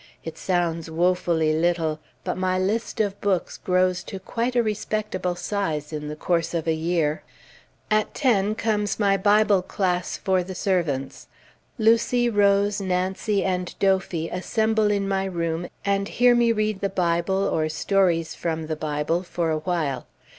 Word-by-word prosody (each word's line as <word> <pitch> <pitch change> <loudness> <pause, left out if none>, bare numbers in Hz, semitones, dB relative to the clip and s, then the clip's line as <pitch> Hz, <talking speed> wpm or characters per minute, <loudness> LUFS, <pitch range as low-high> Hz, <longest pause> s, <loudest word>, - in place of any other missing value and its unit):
It 165 - -6
sounds 170 -3 -1
woefully 170 -2 +1
little, 160 -1 0 0.2
but - - -2
my 185 0 0
list 215 +5 -1
of 205 -2 -1
books 195 -3 0
grows 185 0 +1
to 195 - -6
quite 235 +5 -2
a 240 - +4
respectable 210 -4 -2
size, 160 -7 -3
in 150 -1 -4
the 150 - -5
course 170 +1 -1
of 165 - -1
a 160 - +2
year. 160 -1 0 0.7
At 215 0 +1
ten 215 -6 +2
comes 210 -2 -1
my 200 -2 +3
Bible 205 0 +4
class 180 -1 -1
for 190 -2 +1
the 185 +1 -7
servants. 160 -9 -1 0.5
Lucy, 235 +2 +3
Rose, 200 -1 +3
Nancy, 190 +2 0
and 180 -1 -2
Dophy 190 -4 +1
assemble 220 +3 +1
in 200 -1 0
my 195 0 0
room, 170 -2 -2 0.2
and 200 0 +1
hear 245 +2 +4
me 240 -1 +4
read 215 -2 -1
the 200 - 0
Bible, 180 +1 0
or 155 -1 0
stories 170 -1 +1
from 160 -1 -3
the 155 0 -3
Bible 150 +2 -1
for 175 -2 -2
a 155 - 0
while. 155 -6 -2
185 Hz, 155 wpm, -24 LUFS, 165-205 Hz, 0.7 s, a